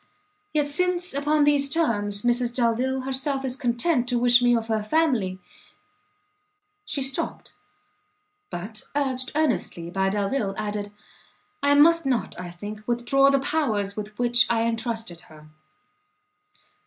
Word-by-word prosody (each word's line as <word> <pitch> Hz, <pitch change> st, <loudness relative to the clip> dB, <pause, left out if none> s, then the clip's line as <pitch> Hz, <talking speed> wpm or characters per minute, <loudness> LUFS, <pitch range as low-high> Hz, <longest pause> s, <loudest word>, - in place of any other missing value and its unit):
yet, 295 Hz, -2 st, 0 dB
since 360 Hz, +3 st, +1 dB
upon 295 Hz, +2 st, +1 dB
these 290 Hz, -1 st, +3 dB
terms, 205 Hz, -10 st, 0 dB
Mrs 240 Hz, 0 st, +1 dB
Delvile 255 Hz, +2 st, 0 dB
herself 270 Hz, +1 st, -1 dB
is 255 Hz, -1 st, -2 dB
content 245 Hz, 0 st, 0 dB
to 245 Hz, -, +1 dB
wish 245 Hz, 0 st, +5 dB
me 245 Hz, 0 st, +4 dB
of 225 Hz, -1 st, -4 dB
her 220 Hz, -1 st, 0 dB
family 215 Hz, -, 0 dB, 0.8 s
" 415 Hz, 0 st, -48 dB
She 275 Hz, -, -1 dB
stopt; 270 Hz, +1 st, -2 dB, 1.0 s
but, 210 Hz, -, -7 dB
urged 260 Hz, -3 st, -1 dB
earnestly 190 Hz, -, -1 dB
by 190 Hz, +1 st, 0 dB
Delvile, 200 Hz, +1 st, -1 dB
added 205 Hz, -1 st, -4 dB, 0.7 s
"I 285 Hz, 0 st, +3 dB
must 330 Hz, +1 st, +5 dB
not, 240 Hz, -7 st, -1 dB
I 180 Hz, -1 st, -6 dB
think, 205 Hz, +5 st, -8 dB
withdraw 245 Hz, +3 st, +3 dB
the 275 Hz, -, +3 dB
powers 225 Hz, -9 st, -1 dB
with 210 Hz, 0 st, -7 dB
which 240 Hz, 0 st, +4 dB
I 230 Hz, -1 st, +1 dB
entrusted 225 Hz, -5 st, -3 dB
her." 155 Hz, -1 st, -15 dB
245 Hz, 135 wpm, -24 LUFS, 215-285 Hz, 1.0 s, wish